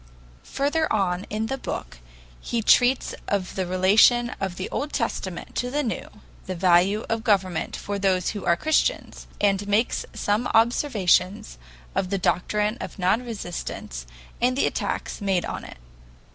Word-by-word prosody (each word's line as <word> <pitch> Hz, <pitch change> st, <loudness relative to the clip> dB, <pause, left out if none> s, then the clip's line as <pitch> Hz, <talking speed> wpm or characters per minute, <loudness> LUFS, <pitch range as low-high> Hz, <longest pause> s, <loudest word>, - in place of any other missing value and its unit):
Further 300 Hz, +3 st, +1 dB
on 185 Hz, -2 st, 0 dB
in 215 Hz, +1 st, -2 dB
the 270 Hz, +4 st, -3 dB
book 60 Hz, -, -6 dB, 0.4 s
he 235 Hz, -2 st, -2 dB
treats 250 Hz, +4 st, +4 dB
of 195 Hz, -3 st, -1 dB
the 185 Hz, -2 st, -2 dB
relation 210 Hz, +6 st, +4 dB
of 190 Hz, -2 st, -3 dB
the 185 Hz, -, -4 dB
Old 295 Hz, +1 st, -3 dB
Testament 190 Hz, -7 st, -3 dB
to 245 Hz, -, -1 dB
the 295 Hz, +3 st, 0 dB
New, 230 Hz, -, -3 dB, 0.4 s
the 185 Hz, -, -3 dB
value 185 Hz, +4 st, +3 dB
of 225 Hz, 0 st, -2 dB
government 190 Hz, -7 st, +1 dB
for 200 Hz, 0 st, -4 dB
those 185 Hz, -2 st, +1 dB
who 205 Hz, -4 st, -6 dB
are 170 Hz, -, +3 dB
Christians, 315 Hz, -, 0 dB
and 200 Hz, 0 st, +1 dB
makes 210 Hz, +4 st, +1 dB
some 210 Hz, +4 st, 0 dB
observations 205 Hz, -, +2 dB, 0.4 s
on 185 Hz, -, 0 dB
the 200 Hz, -, 0 dB
doctrine 210 Hz, +5 st, 0 dB
of -, -, -7 dB
non 190 Hz, +6 st, +2 dB
resistance 175 Hz, -, -6 dB, 0.3 s
and 250 Hz, +2 st, +2 dB
the -, -, +3 dB
attacks -, -, -3 dB
made 195 Hz, -3 st, +1 dB
on -, -, -5 dB
it. -, -, -10 dB
205 Hz, 155 wpm, -24 LUFS, 185-235 Hz, 0.4 s, treats